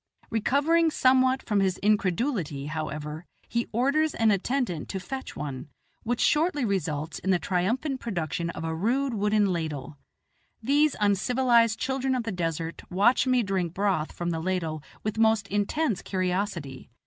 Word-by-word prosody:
Recovering 290 +9 +3
somewhat 260 -2 +3
from 210 -2 +1
his 190 -2 +1
incredulity, 195 - 0
however, 155 +1 -5 0.2
he 235 0 -1
orders 280 +7 +1
an 225 -1 +3
attendant 200 - -1
to 190 - -3
fetch 265 +9 -6
one, 140 -2 -6 0.3
which 240 +1 -2
shortly 300 -3 +2
results 165 -6 -2
in 190 - -4
the 185 - +4
triumphant 230 - -1
production 170 - -3
of 165 - -6
a 160 0 -2
rude 245 +10 0
wooden 210 -2 +2
ladle. 150 -4 -4 0.6
These 285 +4 +2
uncivilized 230 +3 +3
children 265 0 -1
of 250 - -1
the 225 - -3
desert 165 -2 -3
watch 210 +8 +3
me 255 -2 +3
drink 185 -4 -2
broth 195 -6 0
from 175 0 -3
the 165 - -2
ladle 165 -3 -2 0.2
with 215 +1 -2
most 220 -2 +3
intense 205 - 0
curiosity. 180 -8 -3
205 Hz, 150 wpm, -27 LUFS, 170-250 Hz, 0.6 s, the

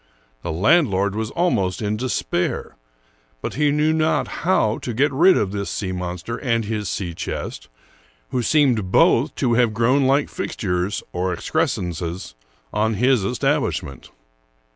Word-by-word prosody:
The 85 - -4
land 140 - +4
lord 100 +1 0
was 110 +1 -3
almost 100 - 0
in 105 0 -1
despair; 110 -6 -2 0.6
but - - -4
he 150 +2 +2
knew 150 +2 +2
not 160 0 +1 0.2
how 165 -12 +2
to 120 - -5
get 145 +5 +2
rid 180 +7 +5
of 100 -3 0
this 100 -1 -3
sea 95 -3 -3
monster 90 +5 -4
and 115 -4 0
his 105 -3 -3
sea 95 -2 -3
chest, 80 - -5 0.6
who 125 - 0
seemed 120 -9 +2
both 135 +9 +4
to 125 -4 +1
have 115 -2 +2
grown 130 +5 +3
like 140 +2 +3
fixtures, 90 0 -2
or 90 +1 -1
excrescences, 90 - -2 0.4
on 110 +1 +1
his 125 0 +3
establish 120 +6 0
ment. 70 - -11
110 Hz, 150 wpm, -22 LUFS, 95-135 Hz, 0.6 s, rid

